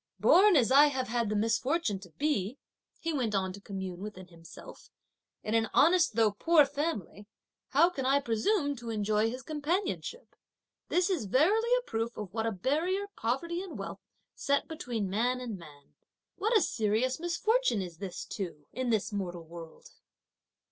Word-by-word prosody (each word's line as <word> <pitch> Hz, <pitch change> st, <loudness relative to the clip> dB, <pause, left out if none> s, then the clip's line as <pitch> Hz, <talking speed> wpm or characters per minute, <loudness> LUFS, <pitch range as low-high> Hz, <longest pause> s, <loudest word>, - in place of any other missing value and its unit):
"Born 400 Hz, +1 st, +6 dB
as 255 Hz, -4 st, +4 dB
I 285 Hz, +2 st, +8 dB
have 265 Hz, -4 st, -2 dB
had 235 Hz, -2 st, 0 dB
the 215 Hz, -, -1 dB
misfortune 225 Hz, -, 0 dB
to 185 Hz, -2 st, -13 dB
be," 265 Hz, -, -1 dB, 0.4 s
he 330 Hz, 0 st, -2 dB
went 240 Hz, -7 st, -1 dB
on 190 Hz, -1 st, -1 dB
to 200 Hz, -, -11 dB
commune 190 Hz, -3 st, -6 dB
within 185 Hz, -3 st, -8 dB
himself, 165 Hz, -1 st, -13 dB, 0.5 s
"in 215 Hz, -, -3 dB
an 225 Hz, -1 st, +2 dB
honest, 340 Hz, +3 st, +4 dB
though 225 Hz, -2 st, +4 dB
poor 305 Hz, +8 st, +4 dB
family, 275 Hz, -, -4 dB, 0.4 s
how 335 Hz, +6 st, +4 dB
can 275 Hz, -6 st, -4 dB
I 270 Hz, +2 st, +3 dB
presume 285 Hz, -, 0 dB
to 235 Hz, -1 st, -7 dB
enjoy 215 Hz, 0 st, +1 dB
his 255 Hz, +2 st, -6 dB
companionship! 340 Hz, -, -3 dB, 0.5 s
This 360 Hz, +2 st, +2 dB
is 315 Hz, -, -1 dB
verily 380 Hz, -, +3 dB
a -, -, -3 dB
proof 225 Hz, -, -3 dB
of 200 Hz, -3 st, -6 dB
what 225 Hz, 0 st, -1 dB
a -, -, 0 dB
barrier 325 Hz, -, -1 dB
poverty 335 Hz, +10 st, -2 dB
and 380 Hz, -3 st, -7 dB
wealth -, -, -6 dB, 0.3 s
set 280 Hz, 0 st, 0 dB
between 240 Hz, -10 st, -3 dB
man 240 Hz, +6 st, 0 dB
and 230 Hz, -6 st, -5 dB
man. 145 Hz, -4 st, -15 dB, 0.4 s
What 445 Hz, +2 st, +2 dB
a -, -, +3 dB
serious 225 Hz, +3 st, 0 dB
misfortune 345 Hz, -, +1 dB
is 175 Hz, -3 st, -9 dB
this 190 Hz, -1 st, -6 dB
too 165 Hz, -7 st, -6 dB
in 255 Hz, 0 st, -2 dB
this 215 Hz, -2 st, 0 dB
mortal 180 Hz, -4 st, -4 dB
world!" 165 Hz, 0 st, -12 dB
240 Hz, 170 wpm, -30 LUFS, 205-315 Hz, 0.5 s, I